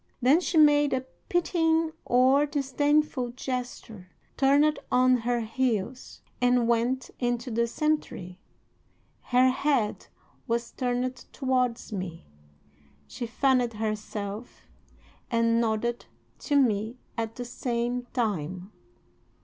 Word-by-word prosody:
Then 265 +6 +5
she 345 -2 -1
made 295 -2 +5
a 260 0 -1 0.2
pitying 325 -2 +2
or 260 +4 +4
disdainful 285 -2 0
gesture, 245 -7 -5 0.3
turned 285 +3 +3
on 255 0 +4
her 240 0 -1
heels, 235 +1 -2 0.2
and 245 -1 +3
went 240 +2 0
into 245 0 -1
the 235 +1 +1
cemetery. 230 - -2 0.8
Her 255 +1 +3
head 265 -5 0 0.4
was 235 0 -1
turned 250 0 -2
towards 255 -4 -1
me. 185 -4 -5 0.8
She 235 - -6
fanned 250 -1 +2
herself 215 0 -5 0.7
and 230 0 +2
nodded 235 +1 -1 0.3
to 290 - -1
me 230 -3 +2 0.2
at 225 -1 -3
the 245 - -5
same 245 0 -2
time. 185 - -2
245 Hz, 105 wpm, -27 LUFS, 230-265 Hz, 0.8 s, Then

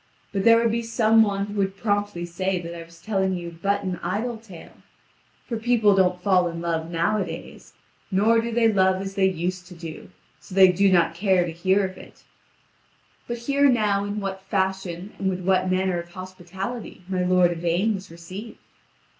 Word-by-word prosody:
But 195 -1 0
there 230 0 +7
would 230 -1 +2
be 235 +1 0
some 225 -1 +3
one 200 -2 +1
who 205 - -8
would 195 0 -1
promptly 205 -4 -1
say 185 +2 -2
that 170 -1 -7
I 170 - -7
was 165 0 -17
telling 190 -3 0
you 170 -2 -7
but 200 +1 0
an 185 -2 -3
idle 220 +7 -2
tale; 195 -7 -14 0.7
for 230 - -3
people 225 -3 +3
don't 180 -2 +2
fall 185 -3 +3
in 170 0 -5
love 165 -1 -2
nowadays, 180 +4 -3 0.4
nor 220 +4 +3
do 235 +1 -4
they 230 0 +3
love 190 -3 +3
as 195 0 -5
they 190 -1 +3
used 180 +1 -3
to 180 - -12
do, 165 -2 -9 0.3
so 185 - -11
they 190 -1 +8
do 195 +2 +3
not 170 -2 +3
care 185 0 +2
to 170 - -4
hear 190 +4 +1
of 185 0 -7
it. - - -15 1.0
But 240 - -3
hear 280 +4 +2
now 210 -5 +2
in 205 +1 -3
what 195 -1 -4
fashion 190 -1 -2
and 195 - 0
with 185 -1 -3
what 185 0 +2
manner 185 -1 +1
of 170 0 -8
hospitality 185 +4 -7
my 185 -1 -1
lord 180 -1 +4
Yvain 175 +5 0
was 195 -1 -7
received. 185 +7 -9
190 Hz, 190 wpm, -24 LUFS, 180-205 Hz, 1.0 s, they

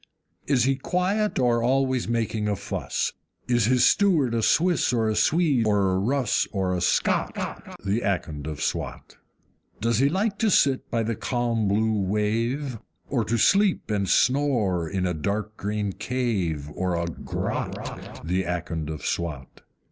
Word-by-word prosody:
Is 135 -4 +3
he 135 +1 +2
quiet, 190 +8 0
or 120 -2 +2
always 130 0 +1
making 110 -2 -1
a 105 - +1
fuss? - - -3 0.3
Is 120 -3 +2
his 125 +1 +4
steward 165 - +3
a 115 - +1
Swiss 170 +4 +3
or 115 -3 +1
a 110 - 0
Swede 145 -8 +2
or 100 -2 +2
a 95 - +1
Russ, 125 +3 +1
or 95 -3 -1
a 90 - -1
SCOT, 90 - +1 0.5
The 100 +4 +1
Akond 80 -6 -2
of 75 -2 -4
Swat? - - -4 0.6
Does 115 +1 +1
he 140 +2 +4
like 200 +4 -1
to 225 - +3
sit 135 -8 +2
by 115 -2 0
the 115 +1 -1
calm 120 -3 -1
blue 110 +1 +1
wave? 115 +6 -1 0.3
Or 125 -4 +1
to 115 - 0
sleep 195 - +3
and 100 -3 0
snore 120 - +2
in 95 -2 -1
a 90 - 0
dark 105 +6 -3
green 105 -1 -2
cave, 95 - -2
or 90 -1 -1
a 85 - -1
GROTT, 85 -1 -5
The 90 +3 0
Akond 85 -3 -3
of 75 -1 -6
Swat? 75 -7 -4
110 Hz, 160 wpm, -25 LUFS, 95-130 Hz, 0.6 s, his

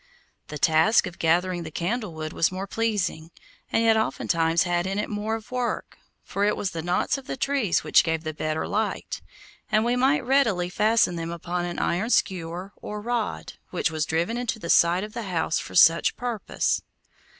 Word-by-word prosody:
The 150 - -6
task 160 +9 +4
of 175 - -8
gathering 175 +2 +1
the 160 - -6
candle 185 +3 -3
wood 155 0 -5
was 165 - +2
more 190 +1 -4
pleasing, 200 -7 -2 0.4
and 225 - +2
yet 225 -1 +5
oftentimes 170 -6 +1
had 175 0 0
in 195 +1 -2
it 210 - -2
more 210 +2 -2
of 225 0 -9
work, 250 -1 -3 0.2
for 200 - -2
it 210 +1 +2
was 195 - -2
the 165 - -4
knots 175 - 0
of 265 - -16
the - - -4
trees 265 -9 +1
which - - +5
gave 160 -1 -1
the 155 -1 -4
better 155 +1 -2
light, 215 +1 -2 0.5
and 215 +1 +3
we 240 +1 +2
might 265 +2 +2
readily 220 -10 +2
fasten 210 -3 +2
them 165 0 -4
upon 175 +1 -3
an 175 0 -5
iron 195 +7 0
skewer, 180 -2 -1
or 210 - -6
rod, 220 - -3 0.2
which - - -1
was 155 -1 -1
driven 170 +9 0
into 240 -2 -2
the 170 -6 -2
side 175 +3 +4
of 210 0 -7
the 225 -5 -5
house 165 -2 0
for - - -8
such 165 -1 +5
purpose. 240 -4 -1
185 Hz, 195 wpm, -25 LUFS, 165-220 Hz, 0.5 s, yet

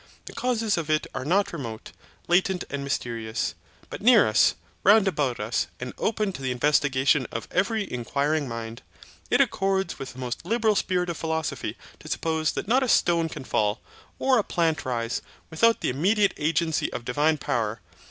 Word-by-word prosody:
The - - -9
causes 230 -5 0
of 160 -2 -5
it 155 0 +2
are 135 - -4
not 195 +7 +1
remote, 115 -9 -6 0.4
latent 180 +1 +2
and 140 -1 -3
mysterious; 115 -4 -2 0.4
but - - -6
near 230 0 +6
us, 110 0 +4 0.3
round 205 +1 +6
about 140 -9 0
us, 105 +3 -1
and 125 0 -5
open 215 -3 0
to 135 - -8
the 130 - -2
investigation 135 0 +2
of 115 - -5
every 215 +4 +1
inquiring 140 +5 -1
mind. 115 -1 -6 0.5
It - - +4
accords 195 -2 0
with 135 -1 -6
the - - -16
most 125 +2 -4
liberal 220 +3 +1
spirit 180 -2 0
of 165 - -6
philosophy 160 -2 -3 0.2
to - - -12
suppose 160 -1 -1
that - - -4
not 250 +5 +3
a 260 - 0
stone 170 -5 +3
can - - -7
fall, 105 -4 0 0.4
or 260 -2 +3
a - - +1
plant 165 -6 0
rise, 120 -1 -2 0.3
without 230 +8 +3
the - - 0
immediate 200 - +2
agency 160 +1 0
of 120 - -6
divine 150 +5 +2
power. 115 -5 -2
155 Hz, 175 wpm, -25 LUFS, 125-195 Hz, 0.5 s, near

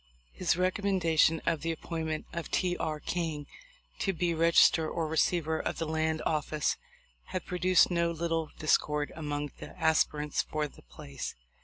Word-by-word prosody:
His - - 0
recommendation 180 -4 +2
of 165 -3 +1
the 165 +2 -1
appointment 160 -1 -4
of 170 -1 -4
T. 180 -1 +1
R. 155 -3 -2
King 160 -3 -3 0.5
to 195 - 0
be 175 0 0
Regis 165 +1 +6
ter 160 -2 -1
or 165 -2 -2
Receiver 160 0 +1
of - - -3
the 165 - -2
Land 160 0 0
Office 155 -1 0 0.5
had 185 - -4
pro 180 - -4
duced 185 0 +5
no 170 -1 +2
little 165 -1 -1
discord 150 -1 +1
among 145 -2 -3
the - - -8
other - - -15
aspirants 150 -2 +2
for 155 -1 -2
the - - -17
place. 70 +3 -7
160 Hz, 165 wpm, -30 LUFS, 155-170 Hz, 0.5 s, Regis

